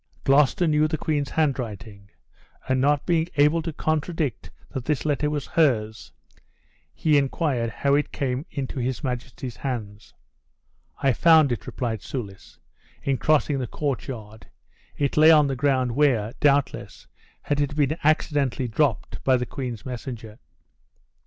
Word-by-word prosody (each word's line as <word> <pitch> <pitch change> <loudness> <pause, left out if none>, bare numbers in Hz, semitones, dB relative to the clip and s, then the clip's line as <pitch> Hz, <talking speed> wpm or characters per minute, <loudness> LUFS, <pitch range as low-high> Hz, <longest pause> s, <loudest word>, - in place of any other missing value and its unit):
Gloucester 140 +5 +3
knew 155 -1 +3
the 155 0 -2
queen's 145 -3 -1
handwriting; 110 -9 -3 0.6
and 130 0 +1
not 145 +1 +2
being 165 -2 +1
able 150 +3 +4
to 165 +1 -4
contradict 155 -4 -2 0.2
that 130 -3 -5
this 150 -1 -1
letter 150 0 +1
was 145 -2 -3
hers, 110 -9 0 0.8
he 150 - +3
inquired 135 -4 -1
how 140 +4 0
it 145 +1 +1
came 130 +1 -3
into 135 0 -4
his 130 +3 -2
majesty's 125 -1 -5
hands. 110 -6 -6 0.9
"I 135 -2 +4
found 155 +2 +5
it," 120 - -4
replied 115 -5 -3
Soulis, 100 -8 -7 0.5
"in 135 -2 0
crossing 150 -2 +2
the 125 - -3
courtyard; 115 -7 -5 0.5
it 140 0 -1
lay 155 +1 +7
on 155 -2 +7
the 135 -1 -1
ground, 130 -2 +1
where, 120 -5 +2
doubtless, 140 -2 0 0.4
it 145 0 0
had 145 0 -1
been 150 0 +1
accidentally 145 -4 +1
dropped 125 +1 -1
by 130 -1 +4
the 125 - -2
queen's 125 -4 -6
messenger." 120 -3 -7
135 Hz, 140 wpm, -24 LUFS, 125-150 Hz, 0.9 s, lay